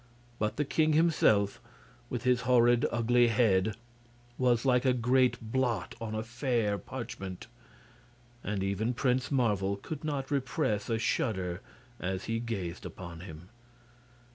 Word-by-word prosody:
But 105 0 -1
the 150 - +1
king 155 +2 +2
himself, 150 -11 +3 0.5
with 120 -3 -3
his 125 0 +3
horrid, 120 -1 +4
ugly 120 +1 +3
head, 110 -3 +2 0.6
was 125 -1 +2
like 125 -1 +3
a 130 -2 +3
great 125 +1 +3
blot 120 +1 -1
on 110 -1 -4
a 110 - -2
fair 115 -3 -1
parchment, 95 -7 -7 1.0
and 100 -2 -2
even 105 +5 -1
Prince 130 +1 +1
Marvel 105 -7 +1
could 150 +9 -7
not 145 -3 -3
repress 125 -6 -1
a 115 - +1
shudder 95 -5 -1 0.4
as 95 +1 -3
he 115 0 -2
gazed 100 -7 -4
upon 85 -3 -8
him. 85 -1 -10
115 Hz, 135 wpm, -30 LUFS, 100-125 Hz, 1.0 s, horrid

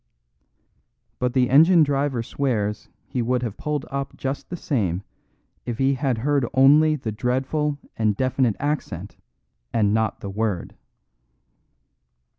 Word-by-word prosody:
But 125 -1 0
the 125 -2 +2
engine 165 +4 +7
driver 140 -4 0
swears 110 -6 -2 0.2
he 130 -3 -3
would 125 +1 0
have 110 -4 -3
pulled 150 -2 -3
up 140 0 -4
just 135 +1 -4
the 175 - -4
same 100 - -1 0.6
if 120 -2 -4
he 135 +1 +2
had 130 -3 0
heard 140 +3 +1
only 150 +4 +6
the 120 -6 -4
dreadful 130 +6 -1 0.2
and 110 -2 +1
definite 130 -4 +1
accent 120 - -3 0.6
and 105 -2 +2
not 110 -1 0
the 100 - -5
word. 105 -3 -2
130 Hz, 130 wpm, -23 LUFS, 110-140 Hz, 0.6 s, engine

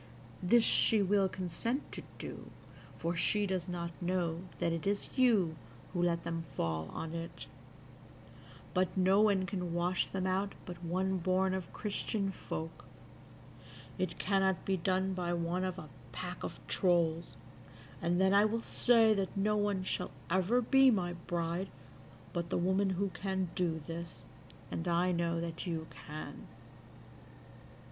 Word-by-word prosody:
This 225 +6 +5
she 220 -2 +6
will 195 0 +3
consent 185 - -3
to - - -6 0.2
do, - - -7 0.5
for 170 +1 -1
she 205 +4 +2
does 185 -2 -2
not 170 -1 -3
know 175 -2 0 0.2
that 165 - 0
it 165 +2 -3
is 200 0 -1
you 215 -11 +4 0.4
who 175 - 0
let 170 -1 +1
them 165 -1 -3
fall 80 -5 -1
on 160 0 -5
it; 165 0 -6 1.3
but 185 +1 +1
no 190 +2 +5
one 200 -3 +3
can 180 -2 -3
wash 175 +1 +1
them 190 -1 -3
out 190 +2 0
but 175 -1 -8
one 185 +2 0
born 185 +2 +2
of 185 -3 -4
Christian 205 -1 -2
folk: 160 -3 -6 1.1
it 175 -2 -1
cannot 195 -2 +1
be 195 - +2
done 190 +2 0
by 175 -1 -1
one 170 +2 -1
of 185 -1 -2
a 155 - -7 0.2
pack 180 +9 -6
of - - -5
trolls; 170 -2 +1 0.7
and 175 +1 +1
then 190 +1 +4
I 200 +1 +6
will 225 +2 0
say 230 -3 +5
that 195 -1 -2
no 210 +2 +2
one 205 -2 +1
shall - - -2 0.2
ever 190 +7 +3
be 270 +2 +6
my 180 -7 +1
bride 170 +2 -2 0.6
but 170 -1 -2
the - - 0
woman 190 +3 +2
who 190 +2 0
can 190 0 -2
do 160 -4 -1
this, 170 0 -7 0.5
and 165 - -3
I 175 +1 +2
know 170 -1 0
that 170 +1 -4
you 165 -2 -2
can." 155 0 -8
185 Hz, 155 wpm, -33 LUFS, 170-195 Hz, 1.3 s, she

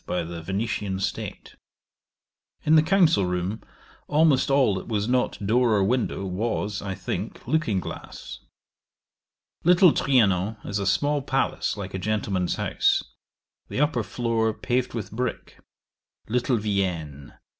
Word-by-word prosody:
by 90 -1 -1
the 85 0 -7
Venetian 100 +1 -2
State. 95 - -5 1.1
In 155 - +5
the 155 - +7
council 165 - +3
room 90 +4 -2 0.5
almost 150 -3 +3
all 135 -6 +4
that 95 - -5
was 105 -2 -1
not 125 0 +1
door 115 +1 +3
or 100 - +3
window, 110 -2 0
was, 105 +1 -2
I 95 -2 -4
think, - - -5
looking 155 -12 +1
glass. - - -8 1.2
Little 175 0 +6
Trianon 110 -6 +2
is 100 0 -2
a 100 - -2
small 145 +7 +1
palace - - -1
like - - -6
a 95 - -3
gentleman's 100 -3 -1
house. - - +1 0.6
The - - -4
upper 145 -4 +2
floor 110 0 -1
paved 125 0 -1
with 105 -4 -5
brick. 125 +3 -4 0.7
Little 120 +2 +1
Vienne. 90 -9 -3
110 Hz, 135 wpm, -25 LUFS, 95-125 Hz, 1.2 s, the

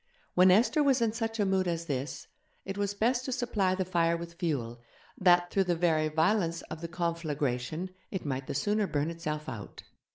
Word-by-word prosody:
When 185 +1 +6
Esther 225 +10 +4
was 275 -3 +4
in 230 -2 +1
such 225 -1 -3
a 205 - +3
mood 190 -1 +1
as 170 -1 -2
this 140 -1 -4 0.4
it 195 - -4
was 200 0 -1
best 240 +4 +1
to 260 - -3
supply 210 -7 0
the 185 0 -1
fire 170 -2 +2
with 170 0 -8
fuel, 135 -9 -3 0.3
that, 175 -1 +4
through 195 -1 +2
the 175 -1 +1
very 160 -2 +2
violence 165 +2 +1
of 155 0 -6
the 170 - -3
conflagration, 165 -2 -2 0.2
it 190 -4 -5
might 135 -2 -3
the - - -4
sooner 210 +2 +1
burn 150 0 -1
itself 155 -2 -4
out. 115 -7 -7
175 Hz, 195 wpm, -30 LUFS, 155-200 Hz, 0.4 s, When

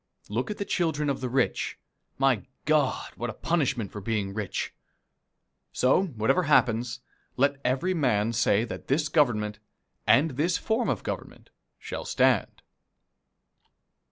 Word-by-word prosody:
Look 115 +5 -2
at 210 - -4
the 200 - -3
children 150 -6 0
of 135 - -4
the 130 - -2
rich. 130 0 0 0.4
My 130 -4 +2 0.2
God, 150 -4 +1
what 120 - -3
a - - -4
punishment 140 - 0
for 105 - -7
being 100 -2 -2
rich! 105 -2 -3 1.0
So, 130 +9 +3
whatever 125 - +1
happens, 125 -7 +2 0.4
let 140 +1 +2
every 135 +9 +1
man 115 - +1
say 110 -1 +3
that 115 - -8
this 150 +3 +1
Government, 105 -9 +1 0.5
and 155 +3 +5
this 160 +7 +1
form 230 +2 0
of - - -1
government, - - -6 0.3
shall - - -6
stand. - - +1
130 Hz, 135 wpm, -27 LUFS, 115-155 Hz, 1.0 s, and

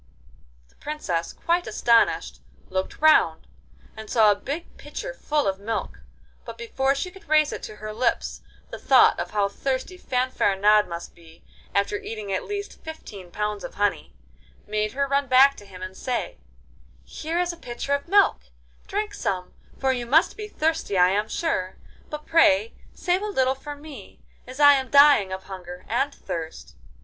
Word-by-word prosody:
The - - -29
Princess, 180 - -3
quite 345 +1 -1
astonished, 230 +2 +2 0.3
looked 190 0 -3
round, 310 0 +4 0.5
and 220 -1 -9
saw 220 -3 +5
a - - +2
big 285 +11 -6
pitcher - - -7
full 300 - -1
of 190 0 -1
milk, 220 +2 -4 0.4
but - - -9
before 275 - 0
she 360 +6 -3
could 385 0 -17
raise 305 -1 +4
it - - -6
to 215 - -8
her 215 0 -7
lips 235 +2 -1 0.3
the - - -7
thought - - +5
of - - -3
how 205 -1 +1
thirsty 265 - -3
Fanfaronade 210 - +2
must 170 -1 -7
be, 165 -1 -18 0.3
after 200 +1 +1
eating 215 -3 -5
at 190 - -2
least 405 0 -6
fifteen 210 - -9
pounds 210 +2 -3
of - - -8
honey, 205 0 -1 0.5
made 215 0 -2
her 280 +1 0
run 280 0 +1
back 265 +2 +6
to 205 - -13
him 185 -1 -10
and 185 0 -7
say: 250 +4 -3 0.6
'Here 320 - -4
is 355 -1 0
a - - -10
pitcher 250 0 -4
of 280 +2 -2
milk; 400 - +3 0.4
drink 420 +1 -2
some, 185 -2 -3 0.2
for 265 -1 +1
you 245 -2 -4
must 315 +7 +4
be 425 -1 -6
thirsty 320 - -1
I 180 0 +6
am 205 +3 0
sure; 190 - -2 0.3
but 300 0 -7
pray 330 +6 +4 0.2
save 360 +1 0
a - - -3
little 265 -10 +1
for 290 +2 -8
me, 285 -8 -12 0.2
as 255 +2 -10
I 290 -1 +8
am 265 -2 -1
dying 280 -9 +6
of 190 0 -5
hunger 180 -2 -9
and 270 +5 0
thirst. 165 - -7
255 Hz, 175 wpm, -24 LUFS, 200-305 Hz, 0.6 s, I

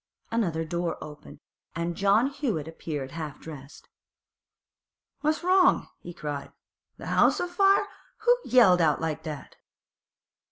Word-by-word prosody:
Another 170 -8 0
door 170 +1 -2
opened, 150 0 -11 0.3
and 170 +1 -2
John 200 +5 +3
Hewett 265 - -2
appeared 150 -4 -5
half 155 -3 -6
dressed. 145 -3 -11 1.3
'What's 310 +2 0
wrong?' 365 0 +4
he 175 - -9
cried. 145 -4 -6 0.5
'The - - -10
'ouse - - +3
o' - - 0
fire? 390 +3 +3 0.4
Who 485 +2 +5
yelled 220 -8 +5
out 155 -3 +3
like 160 -1 -3
that? 155 -3 -8
170 Hz, 125 wpm, -27 LUFS, 155-255 Hz, 1.3 s, Who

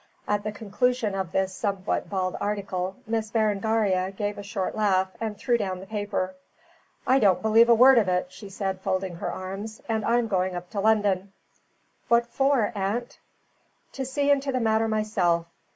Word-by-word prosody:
At 205 0 0
the 215 - -3
conclusion 220 +1 -1
of 190 -3 -3
this 190 0 0
somewhat 195 -1 -2
bald 185 -2 -1
article, 195 -2 -2
Miss 220 -1 -2
Berengaria 210 -3 +1
gave 205 +1 -4
a - - -4
short 200 -2 -3
laugh 190 -3 +2
and 215 -2 -3
threw 235 +3 +1
down 190 -3 -2
the 190 - -9
paper. 205 -3 -3 0.7
"I 265 +1 +4
don't 195 -5 +3
believe 225 +2 +5
a 235 - +7
word 255 +2 +7
of 210 - +1
it," 180 0 0
she 200 0 -11
said, 190 -1 -3
folding 185 -2 -2
her - - -3
arms, 195 +4 -6
"and 220 -2 -1
I'm 235 +1 +2
going 185 -2 0
up 175 0 -7
to 205 - -3
London." 200 -2 +1 0.7
"What 235 0 +4
for, 255 -2 +1
aunt?" 210 +4 -3 0.7
"To 270 - -4
see 280 +2 +1
into 275 -1 +1
the 255 - 0
matter 220 -1 +2
myself. 200 -6 +1
205 Hz, 175 wpm, -26 LUFS, 190-225 Hz, 0.7 s, a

